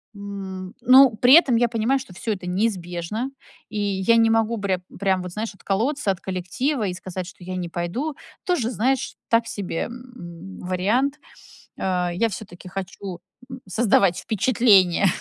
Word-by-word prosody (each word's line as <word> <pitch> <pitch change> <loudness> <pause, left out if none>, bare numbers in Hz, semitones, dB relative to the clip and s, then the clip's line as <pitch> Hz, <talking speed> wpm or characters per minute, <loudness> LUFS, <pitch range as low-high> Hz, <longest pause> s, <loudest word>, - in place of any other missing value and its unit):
м, 195 -2 -7
ну, 255 -1 +7
при 245 +4 +5
этом 280 -8 +6
я 235 +1 +3
понимаю, 230 +4 +1
что 225 -9 -11
всё 220 +4 -2
это 185 -3 -8
неизбежно, 185 +3 -2 0.4
и 215 - -4
я 200 +2 +2
не 225 0 +5
могу 225 +1 +2
прям 190 -3 -1 0.2
прям 190 -2 +1
вот, 180 -1 -6
знаешь, 215 +2 -4
отколоться 215 +5 0
от 190 - -4
коллектива 205 - -2
и 180 - -2
сказать, 185 0 -6
что 180 - -13
я 185 +1 -5
не 180 -2 -3
пойду. 180 - -3 0.3
Тоже, 295 -11 0
знаешь, 260 +3 0
так 230 0 +3
себе, 185 -5 -3
м, 195 -8 -10
вариант, 215 +11 0 0.6
э, 180 -2 0
я 230 +6 +2
всё-таки 185 -3 -9
хочу 190 -1 -6 0.5
создавать 195 -3 +3
впечатление 205 -4 +4
200 Hz, 155 wpm, -23 LUFS, 185-235 Hz, 0.6 s, ну